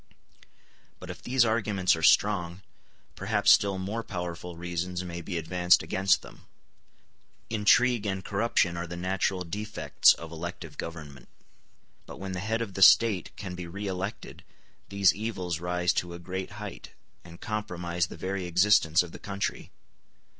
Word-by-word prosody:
But -, -, -7 dB
if -, -, -11 dB
these 125 Hz, -1 st, +2 dB
arguments 105 Hz, -5 st, +1 dB
are 80 Hz, -, -6 dB
strong, 90 Hz, +1 st, +2 dB, 0.5 s
perhaps -, -, +2 dB
still 100 Hz, -2 st, +4 dB
more 100 Hz, +5 st, -3 dB
powerful 90 Hz, -3 st, -6 dB
reasons 90 Hz, +1 st, -3 dB
may 85 Hz, -1 st, -6 dB
be 85 Hz, +1 st, -4 dB
advanced 90 Hz, +2 st, +3 dB
against 95 Hz, 0 st, +1 dB
them. -, -, -15 dB, 1.0 s
Intrigue 115 Hz, +1 st, +3 dB
and 95 Hz, -1 st, -3 dB
corruption 100 Hz, -4 st, +1 dB
are 85 Hz, 0 st, -4 dB
the 85 Hz, +1 st, -7 dB
natural 90 Hz, +1 st, -1 dB
defects 105 Hz, +5 st, +2 dB
of 85 Hz, 0 st, -10 dB
elective 85 Hz, +2 st, -7 dB
government; 75 Hz, -6 st, -8 dB, 0.8 s
but -, -, -10 dB
when 95 Hz, 0 st, -5 dB
the 90 Hz, -, -4 dB
head 110 Hz, +4 st, -1 dB
of 100 Hz, -4 st, -8 dB
the 95 Hz, -, -5 dB
State 105 Hz, -1 st, +6 dB
can 95 Hz, -3 st, -7 dB
be 90 Hz, -1 st, -7 dB
re 100 Hz, +4 st, -6 dB
elected 95 Hz, +1 st, -5 dB, 0.5 s
these 100 Hz, -2 st, +4 dB
evils 95 Hz, -6 st, -4 dB
rise 90 Hz, 0 st, 0 dB
to 85 Hz, 0 st, -2 dB
a -, -, -7 dB
great 95 Hz, +2 st, -6 dB
height, -, -, -9 dB, 0.3 s
and 85 Hz, -1 st, -13 dB
compromise 90 Hz, -5 st, -3 dB
the -, -, -10 dB
very 95 Hz, -1 st, -3 dB
existence 90 Hz, -2 st, +4 dB
of 90 Hz, -, -10 dB
the -, -, -10 dB
country. 100 Hz, 0 st, -4 dB
90 Hz, 155 wpm, -28 LUFS, 85-100 Hz, 1.0 s, State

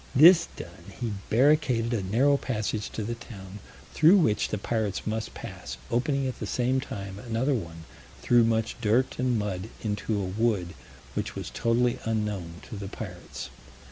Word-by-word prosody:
This 165 Hz, +5 st, +8 dB
done, -, -, -10 dB
he 115 Hz, -3 st, -2 dB, 0.2 s
barricaded 125 Hz, -2 st, +3 dB
a 115 Hz, -, 0 dB
narrow 120 Hz, +10 st, +3 dB
passage 110 Hz, -5 st, -2 dB
to 110 Hz, -, -3 dB
the 115 Hz, +3 st, -2 dB
town 100 Hz, -4 st, -10 dB, 0.3 s
through 165 Hz, +6 st, +7 dB
which 110 Hz, -, +2 dB
the 105 Hz, -, -1 dB
pirates 105 Hz, -1 st, -2 dB
must 110 Hz, 0 st, -3 dB
pass, -, -, -7 dB
opening 135 Hz, +3 st, +1 dB
at 130 Hz, -, -3 dB
the -, -, -4 dB
same 130 Hz, +1 st, +1 dB
time 100 Hz, -7 st, -6 dB
another 125 Hz, +4 st, 0 dB
one 85 Hz, -8 st, -4 dB, 0.4 s
through 120 Hz, -1 st, +5 dB
much 115 Hz, -1 st, +1 dB
dirt 115 Hz, +5 st, +2 dB
and 125 Hz, -2 st, +2 dB
mud 105 Hz, -1 st, -3 dB
into 105 Hz, 0 st, -1 dB
a 100 Hz, -, -1 dB
wood 95 Hz, -2 st, 0 dB, 0.4 s
which -, -, -3 dB
was -, -, -5 dB
totally 120 Hz, +1 st, +1 dB
unknown 105 Hz, -6 st, -2 dB
to 110 Hz, -, -7 dB
the 100 Hz, 0 st, -5 dB
pirates. 90 Hz, -3 st, -7 dB
115 Hz, 165 wpm, -27 LUFS, 100-125 Hz, 0.4 s, This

